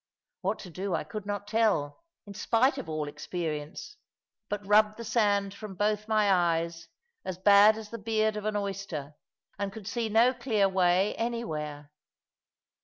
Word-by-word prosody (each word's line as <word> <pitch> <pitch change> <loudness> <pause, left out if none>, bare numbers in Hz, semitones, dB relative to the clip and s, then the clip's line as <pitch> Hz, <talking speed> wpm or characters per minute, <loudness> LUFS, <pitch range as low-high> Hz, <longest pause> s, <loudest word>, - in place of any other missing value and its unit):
What 195 +3 -1
to 180 - -10
do 185 +1 -2
I - - -2
could 205 +6 -7
not 205 -1 -3
tell, 210 - +1 0.2
in 200 - -9
spite 255 +6 +2
of 255 - -7
all 155 -1 -2
experience, 160 - -5 0.5
but 205 -1 -4
rubbed 210 +1 +4
the 235 - -6
sand 205 -3 +1
from 200 -1 -9
both 210 +2 0
my 215 -2 +3
eyes, 170 -2 0 0.4
as 185 - -5
bad 205 +3 +6
as 215 -1 -9
the 230 - -6
beard 215 0 0
of 210 0 -5
an 215 0 -1
oyster, 195 -8 -4 0.5
and 200 -1 -2
could 210 0 -10
see 225 +1 -2
no 230 +4 +4
clear 230 -5 +1
way 185 +1 +2
anywhere. 150 -12 -4
205 Hz, 165 wpm, -29 LUFS, 180-220 Hz, 0.5 s, bad